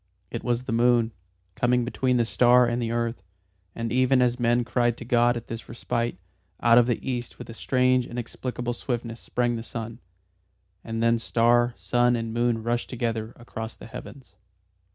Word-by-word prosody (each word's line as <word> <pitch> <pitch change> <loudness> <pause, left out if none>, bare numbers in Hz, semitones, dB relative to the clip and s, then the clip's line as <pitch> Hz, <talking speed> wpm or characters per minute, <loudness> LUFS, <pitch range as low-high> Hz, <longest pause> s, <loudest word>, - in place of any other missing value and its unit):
It - - -5
was 120 0 0
the - - -5
moon, 120 0 +3 0.4
coming 120 +3 +1
between 125 +1 0
the 120 - +2
star 125 +1 +5
and 120 +1 -1
the 115 - -1
earth. 115 0 -2 0.5
And 115 -1 -3
even 130 +1 +3
as 125 0 +2
men 120 0 +2
cried 120 -1 +1
to 120 - -8
God 120 0 +3
at 120 - -7
this 115 0 -8
respite, 115 -2 -2 0.4
out 120 0 +6
of 120 - +3
the 120 +1 -2
East 120 -2 -3
with - - -9
a - - -8
strange 125 +1 +2
inexplicable 120 +1 -4
swiftness 115 -2 -4
sprang 120 -1 -1
the - - -5
sun. 115 0 -7 0.8
And 115 0 -3
then 115 0 +3
star, 120 +1 +2
sun 120 +6 +2
and 115 -1 -3
moon 120 -1 0
rushed 120 +1 -1
together 115 -2 -3
across 115 -1 -7
the - - -12
heavens. 130 +3 -10
120 Hz, 175 wpm, -26 LUFS, 115-125 Hz, 0.8 s, out